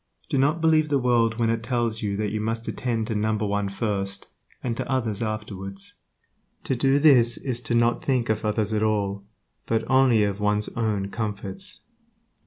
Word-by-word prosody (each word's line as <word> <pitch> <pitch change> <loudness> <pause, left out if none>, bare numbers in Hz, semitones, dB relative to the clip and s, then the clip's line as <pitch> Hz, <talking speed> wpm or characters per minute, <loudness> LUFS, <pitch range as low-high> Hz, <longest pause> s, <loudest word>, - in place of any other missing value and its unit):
Do 135 - +1
not 150 +5 +2
believe 155 -1 +3
the 145 - +3
world 120 -3 +2
when 115 -1 +2
it 115 0 -1
tells 120 -2 -1
you 100 -2 -1
that 105 -1 -1
you 110 0 -2
must 115 +1 -1
always - - -5
attend 115 -3 -1
to 110 - -3
"number 110 0 0
one" 100 0 0
first, 100 -2 -2 0.3
and 120 -2 -1
to - - -4
others 115 -5 -1
afterwards. 100 -3 -4 0.7
To 130 - -1
do 135 +3 +3
this 125 -6 +5
is 125 -2 -3
not 120 0 +2
to - - -16
think 125 -4 +2
of 110 0 0
others 105 0 0
at 105 - +1
all, 100 -2 0 0.4
but 115 -1 0
only 130 -4 +4
of 100 -1 -1
one's 105 0 +1
own 105 -4 -1
comforts. 110 - -5
110 Hz, 190 wpm, -25 LUFS, 105-125 Hz, 0.7 s, this